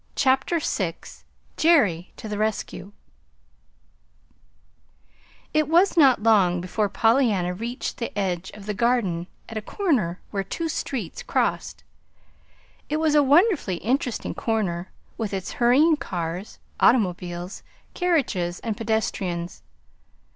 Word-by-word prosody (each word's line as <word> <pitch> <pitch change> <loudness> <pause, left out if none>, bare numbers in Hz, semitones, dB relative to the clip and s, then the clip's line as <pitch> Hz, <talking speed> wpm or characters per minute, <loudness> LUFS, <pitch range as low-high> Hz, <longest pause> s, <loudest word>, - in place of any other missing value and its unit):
CHAPTER 270 +5 +2
VI 185 - -1 0.6
JERRY 210 - +3
TO - - -7
THE 210 -1 -4
RESCUE 210 -3 -3 2.6
It 310 -2 +2
was 350 +5 +4
not 270 -9 +5
long 195 -6 +4
before 200 +4 -1
Pollyanna 225 -7 +2
reached 235 +7 -5
the 235 - -4
edge 190 -2 -2
of 205 -1 -11
the 210 - -2
Garden 200 -7 0 0.2
at 225 - -6
a - - -9
corner 215 - -1
where 195 -2 -1
two 325 - -4
streets 250 - -4
crossed. - - -1 1.1
It 300 - 0
was 315 -1 +2
a 300 - +6
wonderfully 290 - +3
interesting 245 +3 -1
corner, 190 -6 -2 0.3
with 210 -3 -2
its 190 0 -4
hurrying 290 +7 +5
cars, 180 - -5 0.2
automobiles, 180 -5 +1 0.3
carriages 245 - 0
and 225 -2 -3
pedestrians. 200 -6 -2
220 Hz, 115 wpm, -24 LUFS, 180-270 Hz, 2.6 s, a